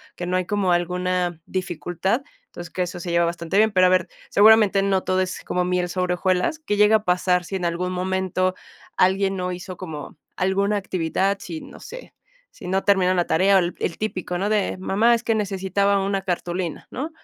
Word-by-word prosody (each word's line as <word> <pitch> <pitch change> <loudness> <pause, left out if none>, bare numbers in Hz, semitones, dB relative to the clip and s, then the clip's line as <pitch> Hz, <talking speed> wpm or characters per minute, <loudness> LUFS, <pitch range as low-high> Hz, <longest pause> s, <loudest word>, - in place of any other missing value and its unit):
que 175 - -5
no 180 +1 0
hay 185 - -1
como 195 -2 0
alguna 180 -1 -1
dificultad, 185 - -2 0.2
entonces 175 - -10
que 185 - -1
eso 175 0 -6
se 175 - -4
lleva 170 0 +3
bastante 170 +2 -2
bien. 220 +1 +4
Pero, 185 -2 +4
a - - +3
ver, 185 -2 +2 0.2
seguramente 210 -1 +5
no 195 -1 +1
todo 185 0 0
es 185 0 -2
como 180 0 -1
miel 180 -1 0
sobre 180 0 -1
hojuelas. 185 - 0
¿Qué 210 -10 -2
llega 210 +1 +6
a 215 - -11
pasar 180 -1 +1
si 190 +3 -6
en 180 - -3
algún 175 +2 -1
momento 185 0 -1 0.4
alguien 195 +1 +2
no 180 -1 -2
hizo 180 +1 -7
como 160 -5 -8 0.2
alguna 200 +3 +1
actividad? 190 +1 -1
Sí, 165 -3 -6
no - - -13
sé, - - -10 0.4
¿si - - -11
no 190 +1 0
terminaron 185 -2 +3
la 175 - +1
tarea? 195 +3 +4
O - - +6
el 175 -1 -2
típico, 185 -4 -3
¿no?, 195 +3 -1
de: 210 -3 0
"Mamá, 215 +5 +3
es 230 - -4
que 225 - +1
necesitaba 200 -1 0
una 195 0 -1
cartulina", 180 -2 -3
¿no? 280 +5 -4
185 Hz, 200 wpm, -23 LUFS, 180-200 Hz, 0.4 s, llega